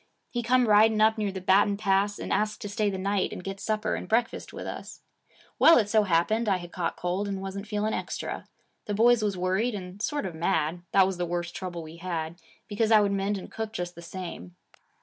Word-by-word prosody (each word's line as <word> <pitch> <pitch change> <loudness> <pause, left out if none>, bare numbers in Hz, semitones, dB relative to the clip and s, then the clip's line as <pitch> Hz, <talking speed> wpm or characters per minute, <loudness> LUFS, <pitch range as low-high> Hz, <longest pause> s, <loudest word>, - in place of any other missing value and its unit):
He 240 - -1
come 245 +1 +3
riding 215 +1 +5
up 220 +1 +4
near 205 -2 0
the 190 - -5
Baton 200 +2 +3
Pass, 200 0 +1
and - - -3
asked 215 0 0
to 205 - -4
stay 210 0 0
the 195 - -3
night 195 +1 0
and - - -7
get 195 +1 -5
supper 215 0 -1
and - - -5
breakfast 230 +1 0
with - - -7
us. - - -7 0.6
Well, 330 - +8
it 215 -4 +2
so 215 -1 +4
happened 205 +6 +2
I 190 - +3
had 175 -1 -9
caught 170 -2 -3
cold 180 +4 -2
and 195 -1 -3
wasn't 195 +2 -6
feeling 215 0 -1
extra. - - -4 0.4
The 205 - -2
boys 235 +2 +5
was 200 -3 0
worried 190 +6 0
and 185 0 -8
sort 290 +3 -1
of 185 - -4
mad, 165 0 0
that 195 -1 +6
was 190 -1 -2
the 175 0 -2
worst 175 0 -3
trouble 175 -3 -5
we 160 +1 -11
had, 170 -1 -4 0.3
because 220 +2 0
I 220 - +8
would 205 -1 +2
mend 200 +1 0
and 190 - -9
cook 220 -1 -5
just 175 -2 -4
the 170 - -11
same. 170 - -8
200 Hz, 230 wpm, -27 LUFS, 180-215 Hz, 0.6 s, Well